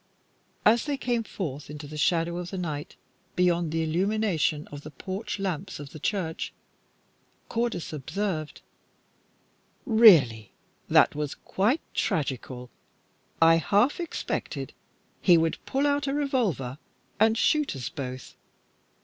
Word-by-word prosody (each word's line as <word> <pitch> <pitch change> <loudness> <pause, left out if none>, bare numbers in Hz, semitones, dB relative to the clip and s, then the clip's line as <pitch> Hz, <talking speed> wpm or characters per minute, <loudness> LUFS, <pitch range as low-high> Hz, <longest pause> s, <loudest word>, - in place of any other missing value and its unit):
As 225 +2 +5
they 290 -2 -1
came 240 -3 0
forth 150 -10 -5
into 150 0 -7
the 150 +2 -9
shadow 170 +2 +1
of 180 0 -5
the 190 - -5
night, 150 -5 -4 0.4
beyond 175 -2 +2
the 165 0 0
illumination 175 -3 0
of 145 -1 -7
the 155 - -9
porch 195 +8 -5
lamps 190 -2 -3
of 145 -2 -8
the 155 - -9
church, 180 -2 -2 1.0
Cordis 230 -9 -2
observed 160 +2 -3 1.2
"Really, 165 - +6 0.4
that - - +5
was 150 -1 -3
quite 225 +11 0
tragical. 130 -4 -2 0.7
I 165 0 +7
half 205 - +2
expected 340 -2 -4 0.5
he 175 -3 +6
would 165 0 0
pull 275 +2 +1
out 285 0 +1
a 275 - 0
revolver 210 - -1 0.4
and 220 +1 +4
shoot 300 - +2
us 130 -3 -4
both. 130 -2 -7
175 Hz, 125 wpm, -27 LUFS, 150-220 Hz, 1.2 s, I